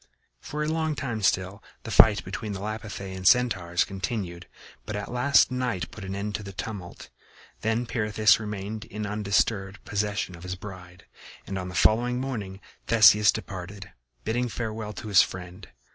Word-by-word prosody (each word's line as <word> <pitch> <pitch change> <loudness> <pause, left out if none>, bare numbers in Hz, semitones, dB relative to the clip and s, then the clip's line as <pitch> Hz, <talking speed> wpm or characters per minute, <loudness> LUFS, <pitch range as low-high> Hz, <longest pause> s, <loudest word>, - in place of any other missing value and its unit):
For 150 - -4
a - - -1
long 160 -1 0
time 120 -6 -3
still 95 +2 0 0.2
the 115 - -6
fight 105 0 +6
between 105 -2 -4
the 95 - -5
Lapithæ 105 -2 -5
and 95 - -6
the - - -9
Centaurs 95 -9 +3
continued, 95 -3 -4 0.4
but 105 - -5
at 105 +1 -5
last 135 +3 +4
night 125 -7 -2
put 105 - -9
an 95 0 -4
end 100 +1 -3
to 105 - -3
the 100 -1 -8
tumult. 95 -3 -7 0.5
Then 110 +2 0
Pirithous 110 -2 +3
remained 105 +1 -5
in 105 0 -5
undisturbed 100 -1 0
possession 105 -3 -2
of 85 - -13
his 90 +1 -4
bride, 90 -2 -11 0.4
and 95 - -5
on 90 0 -5
the 90 - -8
following 120 +5 +3
morning 105 -8 -4 0.3
Theseus 105 -3 +7
departed, 95 +1 -7 0.3
bidding 120 +3 0
farewell 110 -1 -4
to 110 - -8
his 100 -3 +7
friend. 90 +1 -5
105 Hz, 170 wpm, -27 LUFS, 95-110 Hz, 0.5 s, Theseus